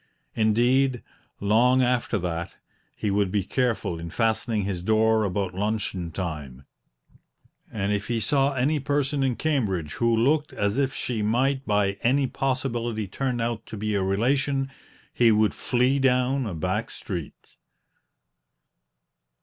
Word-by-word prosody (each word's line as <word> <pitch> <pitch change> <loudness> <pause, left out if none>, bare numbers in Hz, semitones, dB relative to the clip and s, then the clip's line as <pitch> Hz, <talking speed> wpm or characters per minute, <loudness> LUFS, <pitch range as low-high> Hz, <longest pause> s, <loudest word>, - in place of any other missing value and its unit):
Indeed, 120 +4 +2 0.4
long 120 +5 +4
after 120 -2 +1
that, 85 -2 -4 0.4
he 105 - -2
would 100 -1 +1
be 100 -1 +1
careful 115 -7 -1
in 85 0 -6
fastening 110 +1 0
his 95 -3 -3
door 110 +2 +3
about 95 -1 -1
luncheon 95 -3 -2
time, 75 -7 -6 1.1
and 100 -1 -1
if 100 0 -2
he 120 -1 0
saw 140 +3 +2
any 145 +4 +1
person 145 0 0
in 130 -2 +1
Cambridge 100 - -1
who 115 -1 +3
looked 145 +6 +2
as 105 +5 0
if 135 -1 +1
she 120 -4 -3
might 130 +6 +1
by 100 -2 +1
any 135 +3 +3
possibility 120 -5 -2
turn 125 +5 -2
out 115 -1 -2
to 110 - -7
be 105 +1 -2
a 100 - +1
relation, 135 +7 0 0.4
he 120 -2 +4
would 110 0 +3
flee 125 +3 +1
down 130 0 +2
a 95 - -4
back 95 +7 -2
street. 85 -7 -7
115 Hz, 140 wpm, -25 LUFS, 100-130 Hz, 1.1 s, long